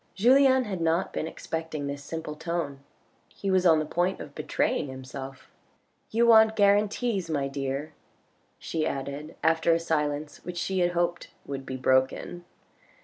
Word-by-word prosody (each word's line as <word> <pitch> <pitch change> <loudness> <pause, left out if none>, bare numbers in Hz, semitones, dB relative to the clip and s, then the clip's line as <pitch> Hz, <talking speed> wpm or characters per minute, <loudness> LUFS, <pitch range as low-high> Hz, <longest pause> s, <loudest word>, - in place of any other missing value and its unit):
Julien 260 +4 +5
had 195 -6 -4
not 165 +3 +1
been 160 - -2
expecting 160 -2 -5
this 140 0 -5
simple 160 +1 -5
tone. 160 -3 -3 0.5
He 195 - -4
was 185 -1 +4
on 160 -2 +6
the 155 - 0
point 175 +4 0
of - - -9
betraying - - -1
himself. 130 0 -9 0.3
" - - -44
You 230 +2 +2
want 220 -1 +6
guarantees, 205 -1 +2
my 140 -3 0
dear, 135 +2 -4 0.6
she 160 -2 -3
added 140 +3 -5
after 165 +1 +3
a - - 0
silence 150 -2 -2
which 175 0 -6
she 190 +2 -1
had 175 0 +2
hoped 175 0 -1 0.2
would 135 -1 -6
be 130 - -4
broken. 130 +7 +1
165 Hz, 155 wpm, -27 LUFS, 140-190 Hz, 0.6 s, on